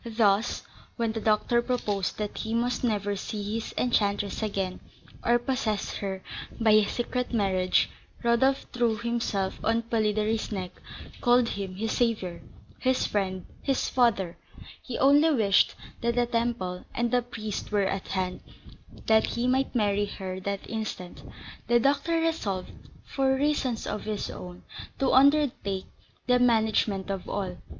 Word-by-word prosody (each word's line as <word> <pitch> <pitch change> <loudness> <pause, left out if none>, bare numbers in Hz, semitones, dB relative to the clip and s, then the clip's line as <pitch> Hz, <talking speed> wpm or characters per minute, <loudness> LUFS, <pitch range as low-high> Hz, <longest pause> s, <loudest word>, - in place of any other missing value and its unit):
Thus, 210 0 +3 0.3
when 230 -2 0
the 220 0 -4
doctor 220 +2 +2
proposed 210 -6 -1
that 210 -1 -4
he 220 0 -2
must 245 +2 0
never 205 -3 0
see 205 +1 -4
his 225 0 -3
enchantress 205 -4 +1
again, 195 -4 -2 0.4
or 240 0 +4
possess 240 -5 -1
her 190 -1 -4 0.4
by 225 -2 +4
a 215 -1 +6
secret 250 +1 -2
marriage, 190 -5 +2 0.4
Rodolph 235 +3 +3
threw 235 -3 +1
himself 230 -4 -1
on 230 +1 +2
Polidori's 220 -1 0
neck, 185 -3 -3 0.5
called 245 -1 +4
him 195 -2 -4
his 220 +3 -2
saviour, 215 -8 0 0.4
his 260 0 +2
friend, 190 -3 -1 0.2
his 270 -2 0
father; 205 -9 +2 0.4
he 250 - -5
only 290 +4 +5
wished 215 -9 +3 0.3
that 235 0 +1
the 245 0 +3
temple 230 -6 -1
and 235 0 0
the 250 0 +3
priest 220 -4 -5
were 205 -2 +2
at 195 0 -2
hand, 185 -1 -2 0.7
that 220 0 +4
he 235 +1 -2
might 260 +1 +1
marry 205 -2 +2
her 185 -2 -5
that 200 +1 -4
instant. 215 -5 -5 0.5
The 240 0 +5
doctor 285 +6 +2
resolved 225 - -1 0.3
(for 265 -1 +1
reasons 270 -4 0
of 210 - -4
his 215 -1 -3
own) 180 0 -9 0.3
to 270 - +1
undertake 260 -8 +3 0.4
the 250 0 +4
management 220 -4 +2
of 195 -2 -4
all. 185 -3 -3
220 Hz, 145 wpm, -27 LUFS, 200-245 Hz, 0.7 s, a